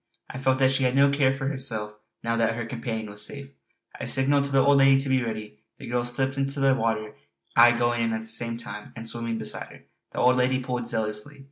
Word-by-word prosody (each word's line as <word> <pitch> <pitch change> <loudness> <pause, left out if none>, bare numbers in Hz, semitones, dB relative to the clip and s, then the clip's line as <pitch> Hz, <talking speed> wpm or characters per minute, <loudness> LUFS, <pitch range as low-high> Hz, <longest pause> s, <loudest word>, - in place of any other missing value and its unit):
I 130 - -7
felt 130 0 +2
that 130 0 +3
she 135 - 0
had 125 0 +1
no 140 +1 +5
care 140 -2 +3
for 135 0 -3
herself, 120 -7 -1 0.3
now 115 0 0
that 115 -1 +1
her 120 0 -4
companion 115 -2 -4
was 105 0 -5
safe. 140 +3 -7 0.5
I - - -4
signalled 140 +1 +3
to 140 - -4
the 135 -1 +3
old 140 0 +5
lady 135 0 +6
to 135 0 -2
be 130 -1 +2
ready; 110 -2 -6 0.2
the - - -10
girl 120 0 -1
slipped 135 +3 -2
into 135 +1 -2
the 135 -1 +4
water, 110 -4 -1 0.4
I 120 +1 +7
going 120 0 +1
in 115 -1 0
at 110 - -2
the - - -13
same 115 +1 -2
time 115 -3 -8
and 115 -1 -7
swimming 115 0 -4
beside - - -4
her. - - -16 0.3
The - - -10
old 125 +1 +4
lady 130 +1 +2
pulled 125 -2 -4
zealously. 110 +4 -3
120 Hz, 240 wpm, -25 LUFS, 115-135 Hz, 0.5 s, I